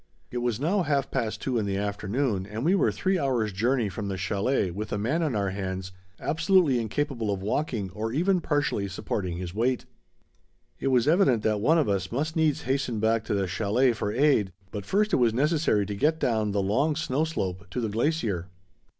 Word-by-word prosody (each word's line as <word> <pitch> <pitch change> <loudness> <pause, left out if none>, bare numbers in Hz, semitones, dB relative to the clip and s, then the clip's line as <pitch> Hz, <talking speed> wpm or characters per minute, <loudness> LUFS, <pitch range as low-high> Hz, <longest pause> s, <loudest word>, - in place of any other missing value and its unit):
It 125 - -2
was 120 -2 -1
now 180 +8 +1
half 145 -4 0
past 115 -5 -2
two 125 -3 0
in 105 - -1
the 95 -1 -1
afternoon 100 +1 -1
and 110 +5 -4
we 175 - +4
were 195 - +3
three 190 -1 0
hours' 120 -7 0
journey 120 +4 +1
from 100 +2 -5
the 95 -1 -3
chalet 100 +2 0
with 105 +4 -5
a - - 0
man 125 +11 0
on 150 -7 0
our 100 -2 0
hands 95 -1 -4 0.3
absolutely 165 -5 +3
incapable 115 -1 -2
of 95 -1 -3
walking 110 -4 -1
or 110 +3 -3
even 180 +7 +2
partially 145 -10 0
supporting 90 -1 -3
his 90 -1 -5
weight. 120 +4 0 0.9
It - - -2
was 130 -1 +3
evident 155 - +4
that 105 -2 +1
one 160 +9 +4
of 155 - +2
us 95 -2 -1
must 150 +6 -2
needs 160 -3 +1
hasten 130 -3 -1
back 110 +1 +2
to - - -1
the 100 -1 +1
chalet 110 +7 +2
for 105 -2 -2
aid, 125 -7 +3 0.2
but 100 -2 -6
first 210 +2 +1
it - - +5
was 120 -3 +3
necessary 145 -7 +2
to 105 - -4
get 155 +9 +1
down 110 -6 +1
the 100 -1 0
long 135 +11 +1
snow 155 -1 0
slope 95 - -3
to 125 - -3
the 115 - -1
glacier. 110 - -1
115 Hz, 205 wpm, -27 LUFS, 100-145 Hz, 0.9 s, it